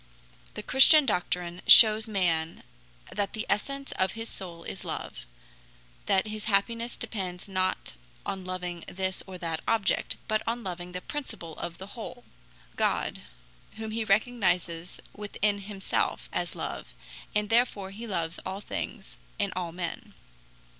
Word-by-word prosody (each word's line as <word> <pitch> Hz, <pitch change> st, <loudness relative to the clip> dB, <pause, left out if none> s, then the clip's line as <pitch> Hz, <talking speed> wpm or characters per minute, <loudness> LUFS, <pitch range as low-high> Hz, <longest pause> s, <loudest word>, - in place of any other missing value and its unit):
The 210 Hz, -, -4 dB
Christian 275 Hz, +5 st, +8 dB
doctrine 180 Hz, -4 st, -1 dB
shows 220 Hz, -1 st, +9 dB
man 170 Hz, -6 st, 0 dB, 0.5 s
that 200 Hz, -1 st, -1 dB
the 220 Hz, 0 st, -3 dB
essence 275 Hz, +6 st, -1 dB
of 190 Hz, 0 st, +1 dB
his 225 Hz, 0 st, -6 dB
soul 170 Hz, -3 st, -7 dB
is 95 Hz, -, -6 dB
love -, -, -5 dB, 0.8 s
that 190 Hz, +1 st, +4 dB
his 215 Hz, 0 st, -5 dB
happiness 230 Hz, +4 st, +1 dB
depends 185 Hz, -3 st, -4 dB
not 185 Hz, -, -1 dB, 0.3 s
on 190 Hz, -1 st, -3 dB
loving 180 Hz, -2 st, -4 dB
this 190 Hz, +1 st, -2 dB
or 185 Hz, -1 st, -7 dB
that 165 Hz, -2 st, -2 dB
object, 220 Hz, -4 st, +1 dB
but 215 Hz, 0 st, +2 dB
on 235 Hz, +1 st, -1 dB
loving 180 Hz, -1 st, -5 dB
the 180 Hz, -, -4 dB
principle 220 Hz, -, -5 dB
of 170 Hz, -, -5 dB
the 195 Hz, +2 st, -9 dB
whole -, -, -7 dB, 0.5 s
God, -, -, 0 dB, 0.5 s
whom 220 Hz, 0 st, -5 dB
he 225 Hz, +1 st, 0 dB
recognizes 185 Hz, -6 st, +2 dB
within 205 Hz, 0 st, -1 dB
himself 195 Hz, -, -2 dB
as -, -, -2 dB
love, -, -, -5 dB, 0.4 s
and 210 Hz, +1 st, +1 dB
therefore 225 Hz, -5 st, +3 dB
he 225 Hz, +4 st, -7 dB
loves 170 Hz, -4 st, -1 dB
all 190 Hz, +1 st, -4 dB
things -, -, -5 dB, 0.2 s
and 200 Hz, -2 st, 0 dB
all 175 Hz, -2 st, -2 dB
men. 175 Hz, 0 st, -5 dB
195 Hz, 140 wpm, -29 LUFS, 180-220 Hz, 0.8 s, shows